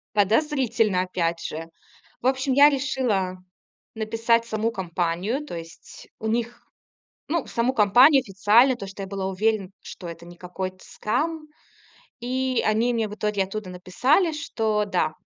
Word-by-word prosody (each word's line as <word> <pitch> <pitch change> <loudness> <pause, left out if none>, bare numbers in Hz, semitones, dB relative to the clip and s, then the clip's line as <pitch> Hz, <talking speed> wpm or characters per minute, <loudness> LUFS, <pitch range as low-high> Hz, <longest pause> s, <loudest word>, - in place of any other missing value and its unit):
Подозрительно 225 - +2
опять 170 -2 -2
же. 165 +1 -5 0.5
В - - -3
общем, 265 +1 +1
я 285 +3 +8
решила 250 -10 -1 0.6
написать 230 +1 +1
в - - -16
саму 220 +1 -1
компанию, 185 - -2
то 235 - -7
есть 165 0 -11
у 220 - -4
них, 235 +1 -3 0.6
ну, 330 -1 0
в - - -16
саму 235 +2 +1
компанию 245 +7 +6
официально, 220 +4 +4
то, 200 - -7
что 195 +1 -8
я - - -5
была 195 -1 -3
уверена, 200 0 0
что 175 - -9
это 170 0 -9
не 175 0 -12
какой-то 185 +1 -6
скам. 305 +8 -2 0.7
И 255 +1 -1
они 225 +3 +2
мне 225 -2 0
в 210 - -7
итоге 210 -2 -1
оттуда 195 0 -6
написали, 255 - +1
что 220 -8 -1
да 175 -5 0
220 Hz, 155 wpm, -24 LUFS, 190-255 Hz, 0.7 s, я